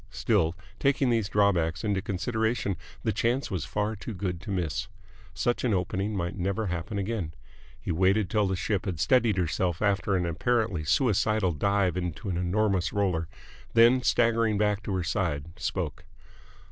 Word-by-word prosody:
Still, 80 +7 +1 0.2
taking 135 -2 +2
these 110 -4 +1
drawbacks 85 -5 +2
into 100 -3 0
consideration, 110 +1 -1 0.3
the 110 - +1
chance 120 +5 0
was 90 -7 -2
far 105 +9 -1
too 110 +2 -7
good 90 -3 -3
to 95 - -9
miss. 90 -5 -2 0.5
Such 120 - 0
an 115 -5 +2
opening 95 +3 -1
might 85 -1 -2
never 100 +3 -1
happen 90 +3 -3
again. 100 -5 -3 0.4
He - - -4
waited 95 +4 +3
till 105 0 +1
the 95 - 0
ship 95 +2 -1
had 90 -5 -3
steadied 120 - +3
herself 90 0 0
after 100 -1 +1
an 90 -1 +1
apparently 100 0 0
suicidal 110 - +2
dive 95 +4 +1
into 90 +2 -3
an 90 - -1
enormous 95 +1 +1
roller, 95 -6 0 0.5
then, 120 +3 +6
staggering 115 -3 +2
back 105 0 +1
to 100 -2 -3
her 90 - -1
side, 85 -6 -1
spoke. - - -3
100 Hz, 160 wpm, -28 LUFS, 90-110 Hz, 0.5 s, then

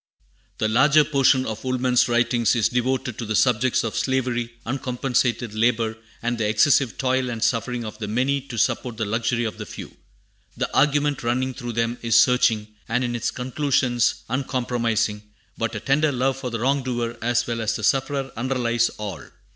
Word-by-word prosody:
The 110 - 0
larger 150 +7 +5
portion 135 -2 +3
of 110 0 -5
Woolman's 130 -1 +2
writings 120 0 +2
is 115 -3 +2
devoted 130 0 -1
to 120 - -3
the 110 - -1
subjects 125 +2 +2
of 115 - -3
slavery, 120 -3 -1
uncompensated 125 -2 -1
labor, 115 0 +1 0.3
and 120 0 -1
the 110 - +1
excessive 125 +2 +3
toil 130 -1 0
and 115 -2 -3
suffering 120 0 0
of 105 - -8
the 105 - -4
many 130 +6 0
to 120 -4 -7
support 115 +2 0
the 110 - -1
luxury 115 +3 0
of 110 - -4
the - - -5
few. - - -9 0.6
The - - -3
argument 145 0 +2
running 130 +2 -1
through 120 -2 -6
them 115 +1 -1
is 115 -1 +4
searching, 115 -3 +3 0.2
and 125 +3 +1
in 120 -1 -2
its 115 - -1
conclusions 130 -2 0
uncompromising, 120 -4 -1 0.3
but 115 0 -3
a - - -2
tender 145 +6 +2
love 130 0 0
for 130 -1 -5
the 115 -1 -4
wrong 135 +3 +2
doer 120 -2 -3
as 120 +1 +1
well 115 -1 -3
as 110 0 0
the 110 - -5
sufferer 135 +2 0
underlies 120 -1 0
all. 105 -3 -6
120 Hz, 180 wpm, -23 LUFS, 115-130 Hz, 0.6 s, larger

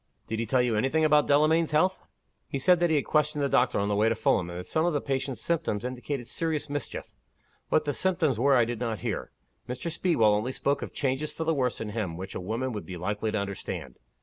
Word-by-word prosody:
'" - - -43
"Did 110 0 -2
he 115 - -2
tell 125 +2 +3
you 120 -2 +1
any 125 +5 +2
thing 160 +2 +2
about 150 -1 +4
Delamayn's 155 +2 +3
health?" 185 +5 +2 0.5
"He - - -3
said 175 +6 +4
that 175 0 +3
he 160 - +3
had 145 - +1
questioned 150 -1 +1
the - - +3
doctor 135 - +2
on 100 - +1
the 105 - +1
way 110 +2 +3
to 115 - +1
Fulham, 100 -5 +1
and 85 - -6
that 90 - -7
some 160 - 0
of 175 -1 +1
the 145 - +1
patient's 135 -1 -3
symptoms 155 -10 -1
indicated 125 0 -4
serious 155 -3 -2
mischief. 145 -3 -4 0.6
What 155 - +2
the 145 - 0
symptoms 165 - +1
were 140 +2 +4
I 120 -2 +5
did 120 -1 -4
not 115 -3 -2
hear. - - -2 0.4
Mr. 125 +7 -3
Speedwell 135 - +3
only 110 +5 -1
spoke 140 +2 0
of - - -5
changes 140 +2 -1
for 160 - -4
the 165 0 +1
worse 130 -4 0
in 110 - -4
him 105 -6 -3
which 95 +2 -6
a - - -4
woman 115 +7 -2
would 105 - -6
be 90 - -6
likely 105 +5 -2
to 110 - -1
understand. 100 -10 -5
130 Hz, 255 wpm, -28 LUFS, 110-150 Hz, 0.6 s, I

